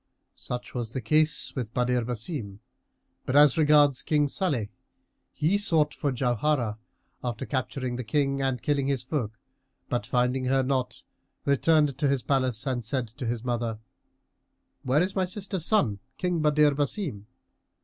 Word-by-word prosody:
Such 125 0 -6
was 120 -2 -4
the 130 - -2
case 155 +6 +1
with 120 -3 -5
Badr 125 0 +2
Basim; 115 - -4 0.7
but 130 - -1
as 145 -2 +7
regards 145 -4 +4
King 150 -2 +2
Salih 140 - -1 0.6
he 170 +7 +1
sought 160 -7 +2
for 145 - -1
Jauharah 120 -2 0 0.4
after 120 0 -3
capturing 130 -2 -2
the 125 - -4
King 135 +4 0
and 130 -3 -1
killing 140 -2 +1
his 135 -3 0
folk; 125 -6 -3 0.5
but, 120 -1 -2
finding 125 +1 +1
her 135 +1 +2
not, 130 -1 -2 0.4
returned 145 0 +3
to 145 - +2
his 135 -2 +1
palace 130 -3 0
and 125 -3 -1
said 120 0 -2
to 120 +2 -6
his 115 0 -2
mother, 120 -2 -2 1.0
"Where 135 +6 +2
is 185 - -3
my 190 -1 +2
sister's 190 -2 -3
son, 115 - +2 0.2
King 180 -2 0
Badr 150 0 +4
Basim?" 140 - -2
130 Hz, 150 wpm, -27 LUFS, 120-150 Hz, 1.0 s, as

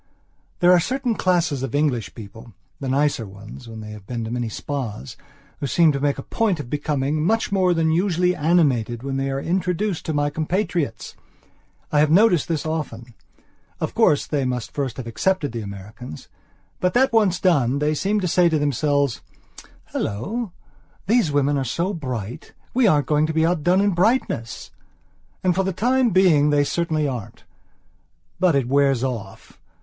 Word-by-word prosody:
There 175 0 +6
are 180 - +6
certain 250 +6 -1
classes 175 -9 +1
of 135 +1 -3
English 140 -7 0
peoplethe 110 +1 -11 0.3
nicer 135 -3 0
ones 100 +5 -11
when 110 -1 -8
they 105 0 -8
have 105 -2 -11
been 120 -2 -4
to 110 - -5
many 120 -1 -2
spas, 115 - -5 0.4
who 140 - -2
seem 165 +3 +4
to 140 - -2
make 145 0 0
a 135 - -6
point 210 -7 0
of 130 -5 -7
becoming 150 0 -1
much 225 +6 +1
more 190 -2 +3
than 160 -1 +2
usually 180 +1 +1
animated 135 -8 +1
when 135 0 -3
they 135 0 -1
are 135 0 -2
introduced 180 +3 -1
to 160 - -1
my 145 0 0
compatriots. 160 - -2 0.8
I 150 - +3
have 150 0 +4
noticed 180 -1 +4
this 160 -3 -2
often. 125 -7 -4 0.7
Of - - -3
course, 145 - +3
they 145 -3 -1
must 125 -2 -3
first 135 -4 -3
have 130 - -5
accepted 145 +6 0
the 115 -1 -4
Americans. 100 - -9 0.5
But 180 +3 0
that 260 0 +3
once 200 -6 +3
done, 140 -8 +2
they 150 +1 +1
seem 200 +7 0
to 180 - 0
say 175 +1 +4
to 160 - +1
themselves: 145 -2 0 0.7
"Hallo, 195 - -3 0.5
these 220 -5 +2
women 145 0 +2
are - - -1
so 170 - -2
bright. 125 - -6 0.2
We 250 -2 +4
aren't 150 -6 +3
going 150 0 +2
to 160 - -3
be 160 0 +3
outdone 175 +2 +2
in 205 0 +2
brightness." 180 - 0 0.7
And 180 - +3
for 190 +2 +1
the 190 - -1
time 250 +6 +2
being 175 -7 +4
they 145 -1 +3
certainly 155 -1 0
aren't. 115 -5 -6 1.0
But 180 -4 +3
it 135 -3 +1
wears 135 -2 +2
off. 115 -7 -6
150 Hz, 175 wpm, -22 LUFS, 125-180 Hz, 1.0 s, There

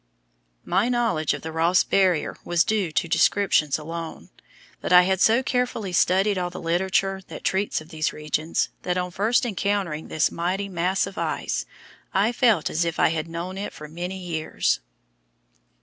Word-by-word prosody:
My 195 +7 +1
knowledge 230 -11 +1
of - - -10
the 160 - -5
Ross 165 +3 +3
Barrier 185 -5 +2
was 175 0 +2
due 205 -6 0
to 180 +2 0
descriptions 160 -5 +2
alone; 165 +1 -7 0.5
but - - -4
I 180 0 +8
had 190 0 0
so 230 +4 +4
carefully 245 -7 -1
studied 190 +3 +3
all 180 -1 -1
the 175 - -8
literature 190 +3 0
that - - -9
treats 190 -3 0
of 155 - -14
these 155 -2 -1
regions, 155 +1 -1
that, 180 0 -1
on 180 0 -2
first 220 +7 +1
encountering 200 -7 -1
this 155 - +1
mighty 185 +4 -2
mass 185 +1 0
of 195 0 -7
ice, - - -2 0.5
I 200 +4 +3
felt 230 - +3
as 165 - 0
if 170 -1 -3
I - - +5
had 160 0 -2
known 175 +3 -5
it 205 - -5
for 150 - -9
many 175 +4 -5
years. 165 - -1
180 Hz, 170 wpm, -24 LUFS, 165-195 Hz, 0.5 s, I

